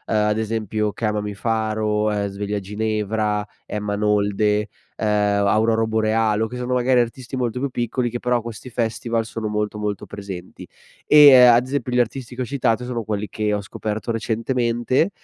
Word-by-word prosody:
ad 105 0 +2
esempio 110 -1 -2
Chiamami 105 -2 -2
Faro, 110 -1 0
ehm, 100 -1 -1
Sveglia 100 +1 -3
Ginevra, 105 +1 -1 0.2
Emma 105 -1 -3
Nolde, 105 0 +1 0.3
ehm, 105 -1 +1
Auroro 110 +2 +2
Borealo, 110 0 +1
che 125 - -8
sono 125 +1 -2
magari 125 0 +3
artisti 120 +2 -5
molto 125 -1 -2
più 140 +2 -1
piccoli 120 0 -1
che 120 - -4
però 125 0 +1
a - - -3
questi 115 +2 -8
festival 115 -1 -1
sono 115 -1 -5
molto 105 0 -2
molto 105 -1 -3
presenti. 100 -3 -8 0.4
Ehm, 150 -1 +9
e 130 - +9
ad 120 0 +6
esempio 130 -2 -3
gli 125 - +3
artisti 125 +1 -2
che 130 - -4
ho - - -1
citato 125 -3 0
sono 120 -2 -3
quelli 105 -1 -3
che 105 0 -2
ho 105 - 0
scoperto 110 +3 -4
recentemente, 120 - 0
110 Hz, 170 wpm, -22 LUFS, 105-120 Hz, 0.4 s, Ehm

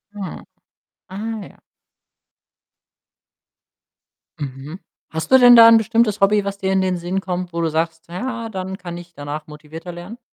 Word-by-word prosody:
Ah. 195 -3 -7 0.7
Ah 215 +4 -5
ja. - - -21 2.8
Mhm. 140 +5 -7 0.3
Hast 160 +6 -4
du 260 - +9
denn 245 -1 +9
da 230 -1 +10
'n 230 - +8
bestimmtes 220 -1 +1
Hobby, 205 0 +3
was 200 0 -4
dir 190 0 -1
in 190 - +2
den 185 -1 0
Sinn 175 +2 -2
kommt, 180 -1 -4
wo 170 0 -3
du 165 - +1
sagst: 165 +1 -2
„Ja, 230 +6 -4
dann 190 -2 -5
kann 175 -2 -7
ich 175 0 -12
danach 145 +1 -6
motivierter 155 +3 -10
lernen?“ 175 +7 -9
185 Hz, 155 wpm, -20 LUFS, 165-210 Hz, 2.8 s, da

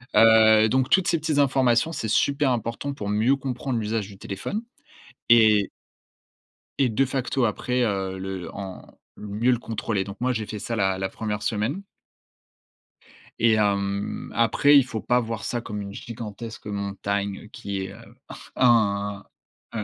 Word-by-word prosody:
Heu, 110 -1 +7
donc 130 +2 +1
toutes 190 -2 +3
ces 165 - +2
petites 155 -1 -1
informations, 130 0 +3
c'est 115 -8 -4
super 140 +5 +2
important 120 +4 -3
pour 100 -6 -5
mieux 110 +6 +3
comprendre 130 -1 -3
l'usage 110 -2 -2
du 100 -2 -13
téléphone. 105 - -5 0.7
Et 110 -3 +6 1.1
et 135 - +3
de 120 +4 +2
facto 130 0 -1
après, 125 +3 0
heu, 95 -3 -2
le 95 -1 -6
en 95 -2 -7 0.4
mieux 105 +4 0
le 120 - +1
contrôler. 110 -3 -2
Donc 100 +1 -8
moi, 125 +1 +1
j'ai 110 -3 -3
fait 105 -1 -6
ça 115 - -3
la 95 -3 +1
la 95 0 -2
1re 105 +1 -4
semaine 115 - -1 1.6
et 115 -1 +4
hem, 100 -1 -1
après, 140 +5 +4
il 135 - +4
faut 115 -4 -5
pas 125 +3 +2
voir 115 -2 -5
ça 120 - -2
comme 105 -3 -6
une 100 -1 -6
gigantesque 115 0 -8
montagne 100 0 -3
qui 100 -3 -5
est, 95 - -7
heu, - - -15 0.4
im, 100 -5 +2 0.5
heu, 110 - -2
110 Hz, 155 wpm, -24 LUFS, 100-125 Hz, 1.6 s, Heu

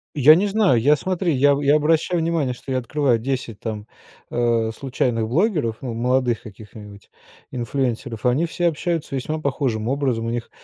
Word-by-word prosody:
Я 150 +2 +7
не 190 +5 +2
знаю, 195 - +3
я, 145 +4 +5
смотри, 180 +1 -1
я 140 +2 +4
я 145 +1 +4
обращаю 160 +3 +2
внимание, 160 -6 0
что 135 - -9
я 130 - +1
открываю 125 -1 0
10 120 -3 -4
там, 105 -2 -5 0.5
а, 115 -2 +1
случайных 120 -4 -1
блогеров, 150 - 0
ну, 125 -3 -4
молодых 125 0 0
каких-нибудь 105 -1 -13 0.4
инфлюэнсеров. 120 -2 -3
Они 135 +7 +2
все 175 +1 -1
общаются 165 -2 -2
весьма 155 +4 -3
похожим 130 -6 -2
образом, 130 -4 -1
у 115 - -2
них 120 -1 -4
130 Hz, 165 wpm, -22 LUFS, 115-150 Hz, 0.5 s, Я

